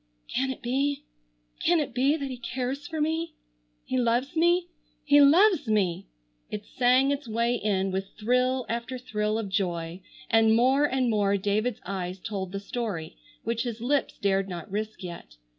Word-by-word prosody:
"Can 265 +2 +1
it 265 - -6
be, 275 +3 0 0.6
can 345 0 +4
it 290 -5 -2
be 270 +5 +2
that 275 -3 -4
he 255 - -5
cares 260 +4 -4
for 320 -2 -4
me? 320 +1 -1 0.5
He 255 - 0
loves 245 +6 +1
me. 345 +2 +3 0.4
He 290 0 +6
loves 320 - +5
me!" 195 -6 +1 0.4
It 210 0 -5
sang 255 +2 +3
its 285 -2 -3
way 230 +2 +1
in 195 -5 0
with 190 +1 -2
thrill 250 +3 +1
after 235 +3 -3
thrill 215 -3 -1
of 225 -2 -3
joy 175 -2 -2 0.3
and 225 +2 +4
more 260 +5 +4
and 260 -3 +1
more 200 -2 +2
David's 210 +4 -1
eyes 185 -1 -4
told 190 -2 -4
the 195 - -3
story 200 -7 -4 0.3
which 230 0 -1
his 235 -2 -4
lips 270 +4 0
dared 195 -1 +1
not 175 +1 -7
risk 215 0 -4
yet. 170 - -8
235 Hz, 170 wpm, -27 LUFS, 200-270 Hz, 0.6 s, He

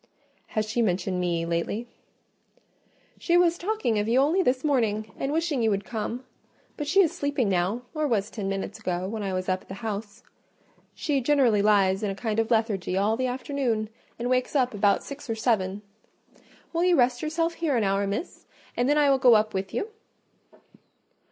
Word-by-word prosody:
"Has 215 0 +1
she 235 +3 0
mentioned 185 -2 0
me 170 -2 0
lately?" 170 +8 -2 1.3
"She 345 0 +2
was 345 -1 +4
talking 355 - 0
of 210 - -1
you 240 +3 +3
only 310 +8 +3
this 255 -6 +1
morning, 220 -7 0
and 270 - -3
wishing 315 -4 0
you 225 - +3
would 200 -1 -1
come, 235 +2 -4 0.5
but 295 - -4
she 385 +7 +5
is 340 - +3
sleeping 285 -6 0
now, 190 +6 0
or 305 -1 0
was 215 -4 0
ten 200 -4 -4
minutes 195 0 -4
ago, 180 0 -2
when 220 +2 -4
I 195 -1 -2
was 185 0 -2
up 185 -1 0
at - - -21
the 190 - -7
house. 210 -2 -6 0.7
She 285 -3 0
generally 250 -6 +3
lies 200 -2 +3
in 210 - -1
a 195 - -3
kind 220 +1 -2
of 225 - 0
lethargy 210 -5 0
all 205 +3 +2
the 255 +2 -1
afternoon, 250 -4 -2 0.3
and 240 - -3
wakes 255 +3 0
up 255 -3 +2
about 205 -1 +2
six 280 -2 -9
or 225 - 0
seven. 210 -3 0 0.9
Will 335 +1 +1
you 360 -1 +4
rest 245 0 +2
yourself 330 +2 -1
here 320 -6 0
an 225 - +1
hour, 195 0 +1
Miss, 200 - -5 0.3
and 245 +2 +1
then 295 - +3
I 295 -1 +4
will 270 - +3
go 245 -3 +7
up 215 0 +2
with 190 0 -3
you?" 420 - -3
225 Hz, 195 wpm, -26 LUFS, 200-275 Hz, 1.3 s, go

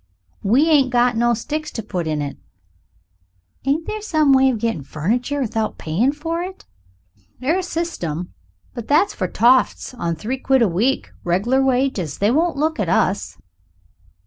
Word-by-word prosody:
"We 250 +10 +3
ain't 290 -5 +4
got 245 -1 +2
no 235 +1 +2
sticks 305 +6 -4
to 225 - -4
put 180 -5 -3
in 155 -2 -1
it." 140 - -5 1.3
"Ain't 295 +4 0
there 430 0 -4
some 310 -8 +3
way 265 0 +5
you 255 -3 +1
get 225 -9 -2
furniture 230 - -2
without 225 -4 -2
payin' 190 - +1
for 325 +3 -3
it?" 370 +1 -7 0.7
"'Ire 305 +9 +1
systim. 250 - -4 0.4
But 235 -2 -7
that's 320 +8 +3
for 185 - -2
toffs 250 +6 +2
on 170 -8 -2
three 235 +11 -4
quid 265 -2 +3
a - - +4
week, 215 +10 0
reg'lar 205 +10 +1
wages. 255 - 0
They 205 +3 +2
wouldn't 325 +3 +1
look 310 -1 0
at 195 -5 0
us." 185 +2 0
250 Hz, 160 wpm, -20 LUFS, 200-295 Hz, 1.3 s, way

